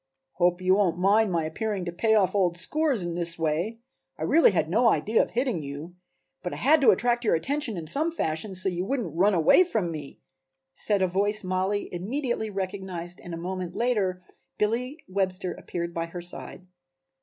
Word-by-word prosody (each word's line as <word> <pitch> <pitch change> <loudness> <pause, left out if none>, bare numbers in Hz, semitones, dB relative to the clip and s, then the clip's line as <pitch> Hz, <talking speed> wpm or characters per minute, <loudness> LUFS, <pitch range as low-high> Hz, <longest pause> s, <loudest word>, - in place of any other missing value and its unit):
"Hope 175 +2 +1
you 185 +1 +4
won't 190 -4 +2
mind 200 +3 +3
my 165 -2 0
appearing 200 +3 -3
to 175 - -3
pay 220 +6 +2
off 190 -4 +3
old 180 -4 +1
scores 275 - +1
in 175 -1 -3
this 170 -1 -3
way; 165 +8 -1 0.4
I - - -5
really 330 +1 +5
had 180 -5 0
no 230 +8 +3
idea 220 +1 +2
of - - -2
hitting 245 - -1
you, 145 +5 -7 0.5
but 180 - -4
I - - -4
had 300 +3 +4
to 270 - +6
attract 240 0 +2
your 220 - +3
attention 265 - -1
in 165 - -5
some 300 - -1
fashion, 190 - -3
so 185 +1 -3
you 180 -1 -1
wouldn't 210 - -3
run 195 +3 +3
away 170 - +6
from 220 - -1
me," 150 -3 -8 0.5
said 200 +6 +1
a - - +3
voice 205 +4 0
Mollie 190 +2 -1
immediately 225 +4 -2
recognized 185 -3 -5
and 175 -1 -6
a - - -6
moment 180 +1 -5
later 210 -7 +1 0.4
Billy 245 +7 -1
Webster 185 -1 -1
appeared 170 -1 -5
by 165 0 -2
her 175 +1 -7
side. 180 +1 -7
190 Hz, 190 wpm, -26 LUFS, 175-220 Hz, 0.5 s, to